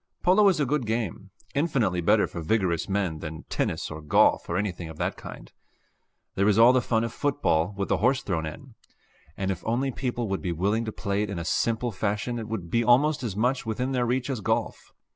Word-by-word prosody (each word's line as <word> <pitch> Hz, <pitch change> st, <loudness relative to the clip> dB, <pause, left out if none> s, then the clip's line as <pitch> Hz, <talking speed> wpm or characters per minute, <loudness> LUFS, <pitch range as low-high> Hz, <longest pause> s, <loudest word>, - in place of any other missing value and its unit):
Polo 195 Hz, +3 st, +5 dB
is 175 Hz, -4 st, +1 dB
a 145 Hz, -, +2 dB
good 135 Hz, -3 st, -1 dB
game, 110 Hz, -3 st, -3 dB, 0.2 s
infinitely 130 Hz, -, +1 dB
better -, -, +4 dB
for 85 Hz, -, -7 dB
vigorous 85 Hz, -1 st, 0 dB
men 95 Hz, -5 st, -1 dB
than 80 Hz, -1 st, -7 dB
tennis -, -, -2 dB
or 80 Hz, -, -7 dB
golf 75 Hz, -, +3 dB
or 85 Hz, -, 0 dB
anything 90 Hz, -4 st, -3 dB
of 80 Hz, -, -10 dB
that -, -, -2 dB
kind. -, -, -10 dB, 0.8 s
There 100 Hz, +1 st, +1 dB
is 105 Hz, -1 st, +3 dB
all 115 Hz, +3 st, +7 dB
the 130 Hz, -, +3 dB
fun 115 Hz, -2 st, 0 dB
of 115 Hz, -, -3 dB
football, 105 Hz, -, 0 dB
with 100 Hz, -, -1 dB
the -, -, +1 dB
horse 130 Hz, +3 st, +2 dB
thrown 80 Hz, -5 st, -2 dB
in; 80 Hz, -, -10 dB, 0.6 s
and 95 Hz, 0 st, -1 dB
if 90 Hz, -, -5 dB
only 125 Hz, +4 st, 0 dB
people 120 Hz, -2 st, -3 dB
would 95 Hz, -1 st, -2 dB
be 90 Hz, -3 st, -2 dB
willing 100 Hz, +7 st, 0 dB
to 110 Hz, -, -3 dB
play 100 Hz, -1 st, -2 dB
it 105 Hz, -, -2 dB
in 85 Hz, -5 st, -4 dB
simple 115 Hz, +7 st, 0 dB
fashion 105 Hz, +4 st, -2 dB
it 110 Hz, -, -6 dB
would 95 Hz, -7 st, -5 dB
be 115 Hz, -, +2 dB
almost 140 Hz, +6 st, +4 dB
as 115 Hz, -7 st, -3 dB
much 125 Hz, +5 st, +1 dB
within 125 Hz, +4 st, -2 dB
their 125 Hz, -2 st, 0 dB
reach 125 Hz, +1 st, 0 dB
as 125 Hz, -5 st, -3 dB
golf. -, -, -2 dB
110 Hz, 220 wpm, -26 LUFS, 95-125 Hz, 0.8 s, all